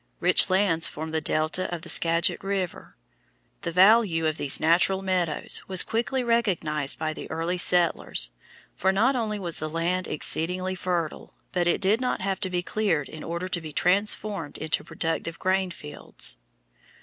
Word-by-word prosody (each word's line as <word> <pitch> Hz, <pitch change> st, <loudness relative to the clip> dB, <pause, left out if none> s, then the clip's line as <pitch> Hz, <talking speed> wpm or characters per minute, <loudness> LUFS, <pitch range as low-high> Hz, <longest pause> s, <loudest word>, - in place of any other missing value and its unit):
Rich -, -, +4 dB
lands 185 Hz, -4 st, +2 dB
form 160 Hz, +1 st, -6 dB
the 160 Hz, 0 st, -1 dB
delta 155 Hz, +5 st, 0 dB
of 170 Hz, -2 st, -5 dB
the -, -, -9 dB
Skagit 165 Hz, +2 st, +1 dB
River. 195 Hz, -3 st, -4 dB, 0.6 s
The 170 Hz, -, -3 dB
value 185 Hz, -2 st, +4 dB
of 155 Hz, 0 st, 0 dB
these 140 Hz, -, +2 dB
natural 180 Hz, +4 st, +2 dB
meadows 180 Hz, -5 st, -1 dB
was 185 Hz, -2 st, +5 dB
quickly 245 Hz, +3 st, -1 dB
recognized 180 Hz, -, +1 dB
by 155 Hz, -1 st, -2 dB
the -, -, -9 dB
early 165 Hz, +3 st, -2 dB
settlers, 170 Hz, -, +3 dB, 0.4 s
for 190 Hz, -, +2 dB
not 230 Hz, +8 st, +2 dB
only 220 Hz, -3 st, -2 dB
was 175 Hz, -4 st, -5 dB
the 155 Hz, -, -4 dB
land 175 Hz, +3 st, -1 dB
exceedingly 180 Hz, +5 st, -2 dB
fertile, 175 Hz, -3 st, -3 dB, 0.2 s
but 175 Hz, -2 st, 0 dB
it 175 Hz, -, +2 dB
did 205 Hz, +5 st, +2 dB
not 250 Hz, -, -1 dB
have 190 Hz, 0 st, -2 dB
to 190 Hz, -, -2 dB
be 180 Hz, -1 st, -2 dB
cleared 180 Hz, -9 st, -1 dB
in 155 Hz, -, -9 dB
order 170 Hz, +2 st, -4 dB
to 175 Hz, -, -2 dB
be 155 Hz, -1 st, -8 dB
transformed 195 Hz, -1 st, 0 dB
into 155 Hz, 0 st, -2 dB
productive 165 Hz, 0 st, -3 dB
grain 190 Hz, 0 st, 0 dB
fields. 150 Hz, -, -4 dB
180 Hz, 165 wpm, -26 LUFS, 160-195 Hz, 0.6 s, was